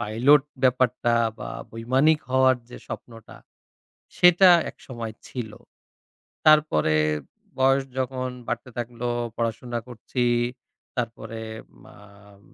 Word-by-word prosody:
Pilot 120 +6 +4 0.2
ব্যাপারটা 125 -2 +2 0.2
বা - - -6 0.2
বৈমানিক 130 +7 +2
হওয়ার 130 0 +4
যে - - -9
স্বপ্নটা 115 -2 -10 0.8
সেটা 180 +1 +7 0.2
একসময় 115 -4 -8
ছিল। 115 -4 -6 1.0
তারপরে 150 - +4 0.6
বয়স 135 +1 +3
যখন 130 0 -2 0.2
বাড়তে 120 +1 -4
থাকলো, 120 0 -4 0.3
পড়াশোনা 115 +1 -2
করছি। 125 +1 -3 0.7
তারপরে 115 -1 -4 0.4
মাম 100 +1 -17
120 Hz, 90 wpm, -24 LUFS, 115-130 Hz, 1.0 s, সেটা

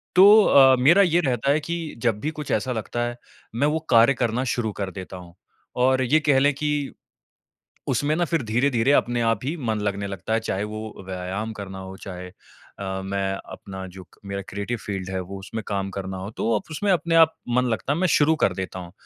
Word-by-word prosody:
तो 185 +1 +8 0.2
अ, 135 -5 +7
मेरा 165 +10 +6
ये 175 -3 +3
रहता 130 -1 +1
है 150 - +3
कि 165 +1 -4
जब 105 -2 +1
भी 155 +7 -2
कुछ 145 - -6
ऐसा 125 +4 0
लगता 120 +1 -3
है, 120 - -5 0.4
मैं 140 +5 +2
वो 155 +2 0
कार्य 115 +3 +6
करना 120 +2 0
शुरू 110 -3 -1
कर 95 -1 -3
देता 95 0 -8
हूँ 90 -1 -12 0.5
और 130 0 +3
ये 150 +5 +3
कह 145 -3 +3
लें 145 +2 +3
कि 150 0 -2 0.9
उसमें 150 +1 +1
ना, 175 +1 +1
फिर 165 -3 0
धीरे-धीरे 120 +3 +1
अपने 120 -4 +2
आप 115 0 +1
ही 155 +5 -2
मन 115 -7 -2
लगने 100 -1 -2
लगता 100 +2 -4
है, 115 - +3
चाहे 105 -3 -3
वो 110 -1 -7
व्यायाम 95 +4 -4
करना 95 -2 -8
हो 95 0 -8
चाहे 90 -2 -8 0.5
अ, 95 -1 -4
मैं 95 0 -1 0.2
अपना 95 -1 -8
जो 95 +1 -11
क - - -23
मेरा 100 0 -4
क्रिएटिव 100 +4 -3
फील्ड 95 -2 -4
है 95 -1 -2
वो 95 +2 -7
उसमें 110 +3 -6
काम 100 -1 -2
करना 95 -1 -5
हो। 95 +2 -6
तो - - -2
वो 115 -1 +2
अप - - -17
उसमें 195 +6 0
अपने 170 -2 +1
आप 160 -1 +6 0.2
मन 125 - +3
लगता 115 +5 -1
है, 160 - -2
मैं 185 - +2
शुरू 160 -1 +4
कर 95 - +3
देता 95 0 -5
हूँ। 85 -1 -9
115 Hz, 225 wpm, -24 LUFS, 95-145 Hz, 0.9 s, तो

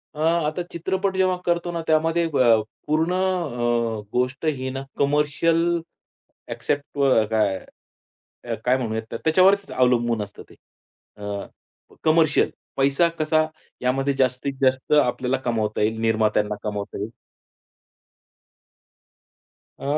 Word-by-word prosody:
अ, - - -9
आता 160 +1 +1
चित्रपट 190 +3 -1
जेव्हा 185 -1 +3
करतो 175 0 0
ना 170 -1 -3
त्यामध्ये 165 +2 +2
ब - - +1 0.5
पूर्ण 160 +3 +1
अ, 120 - 0
गोष्ट 125 +4 -1
ही 130 -4 -1
ना 135 +1 -5 0.2
कमर्शियल 150 +3 +2 0.9
एक्सेप्ट 145 0 -2
ब 130 -6 +4
काय 105 -3 +2 0.9
अ, 115 -1 -2
काय 125 +1 +4
म्हणूया 110 -3 -2
त्या 115 - -5
त्याच्यावरतीच 190 +5 +4
अवलंबून 120 -3 +2
असतं 100 0 -11
ते. - - -16 0.6
अ, 100 -1 -5 0.6
कमर्शियल. 155 -1 +3 0.3
पैसा 140 +5 +3
कसा 155 0 +2 0.4
यामध्ये 135 +2 +1
जास्तीत 130 +2 +1
जास्त 130 0 +1
आपल्याला 125 -2 +2
कमावता 110 -3 -1
येईल, 110 +1 0
निर्मात्यांना 110 -2 +1
कमावता 105 -1 -4
येईल. 105 - -3 2.7
अ, - - -11
135 Hz, 115 wpm, -23 LUFS, 115-160 Hz, 2.7 s, ब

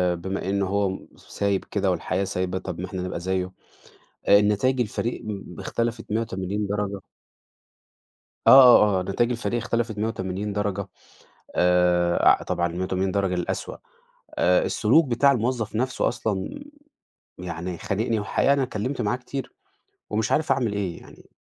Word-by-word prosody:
بما 95 +2 -4
إن 100 0 0
هو 100 +1 0
م 95 - -7
س - - -21
سايب 100 -1 +1
كده - - 0
والحياة 100 - -1
سايبة، 95 0 -2
طب - - -6
ما 90 - -3
إحنا 95 -1 -5
نبقى 90 -1 -4
زيّه. 95 +1 -2 0.8
آآ 100 0 +8
نتايج 105 +6 +1
الفريق 120 +1 -2
م 105 -3 -5
ب - - -8
اختلفت 115 -1 -2
مِيّة 110 +2 +1
وتمانين 100 -1 -3
درجة. 100 0 -3 1.5
آه، - - +6
آه، 105 -6 +7
آه. - - -2
نتايج 115 +6 0
الفريق 120 0 -2
اختلفت 115 -1 -2
مِيّة 105 +1 0
وتمانين 100 -1 -3
درجة. 100 -1 -2 0.7
آآ 90 -1 +3
أع - - +6
طبعًا 85 - -1
المِيّة 85 +2 -4
وتمانين 95 +1 -1
درجة 95 -2 0
للأسوأ. 90 -1 -3 0.6
أ - - +3
السلوك 160 -1 +3
بتاع 135 +3 +4
الموظّف 115 -3 -1
نفسه 130 +2 0
أصلًا 110 - -3 0.8
يعني 90 0 -5
خانقني، 110 +5 -1
وحقيقة 105 +6 +2
أنا 140 -1 +2
اتكلّمت 125 +2 -3
معاه 110 +3 0
كتير، 130 +1 -6 0.6
ومش 110 0 -1
عارف 155 +1 +1
أعمل 120 -6 +1
إيه 95 -4 -3
يعني؟ - - -17
100 Hz, 160 wpm, -24 LUFS, 95-115 Hz, 1.5 s, آآ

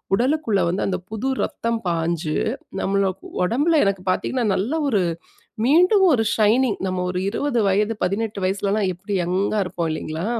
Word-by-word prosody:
உடலுக்குள்ள 250 -3 +1
வந்து 185 +3 -1
அந்த 185 - -1
புது 220 +5 -2
ரத்தம் 230 0 -2
பாஞ்சு, 165 -2 -1 0.4
நம்மளுக் 195 -1 0 0.2
ஒடம்புல 290 - +2
எனக்கு 195 -1 0
பார்த்தீங்கன்னா, 250 +5 -1
நல்ல 215 +10 -1 0.2
ஒரு 210 -7 +2 0.6
மீண்டும் 360 - +5
ஒரு 225 -4 +2
ஷைனிங் 220 +2 +3
நம்ம 185 -1 -2
ஒரு 180 0 -2
20 245 +3 -1
வயது, 210 +3 +2
18 205 +3 -1
வயசுலலாம் 200 +1 0
எப்படி 195 +4 -7
யங்கா 190 +5 0
இருப்போம் 170 -2 -3
இல்லீங்களா? 155 +2 -4
200 Hz, 145 wpm, -22 LUFS, 185-235 Hz, 0.6 s, மீண்டும்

